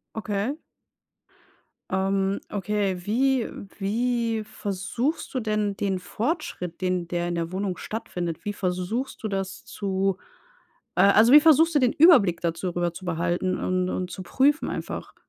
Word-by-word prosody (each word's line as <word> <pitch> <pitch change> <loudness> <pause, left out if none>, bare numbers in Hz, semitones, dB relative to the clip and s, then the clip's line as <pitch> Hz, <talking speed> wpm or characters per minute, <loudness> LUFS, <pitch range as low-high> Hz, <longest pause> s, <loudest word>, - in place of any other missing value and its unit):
Okay. 215 +5 -2 1.3
Ähm, 195 +1 0
okay, 205 -1 -1
wie 255 +2 +2 0.3
wie 230 +2 0
versuchst 210 - -3
du 255 - 0
denn 210 -2 -1
den 195 -2 -1
Fortschritt, 185 - -3
den 180 -2 -1
der 175 0 -1
in 175 - -2
der 170 +1 -3
Wohnung 190 -1 -2
stattfindet, 175 -7 -5
wie 205 - -2
versuchst 185 +7 -3
du 220 - -2
das 195 -1 -4
zu 195 -1 -1 0.8
äh, - - +5
also, 215 +5 +6
wie 295 - +10
versuchst 325 +1 +5
du - - +5
den 250 -2 +3
Überblick 260 - +6
dazu 170 +2 -1
rüber 175 -1 -1
zu 185 - -9
behalten 175 +2 -1
und 185 0 0
und 180 -1 -3
zu 185 - -6
prüfen 285 - +2
einfach? - - -5
195 Hz, 145 wpm, -25 LUFS, 180-230 Hz, 1.3 s, wie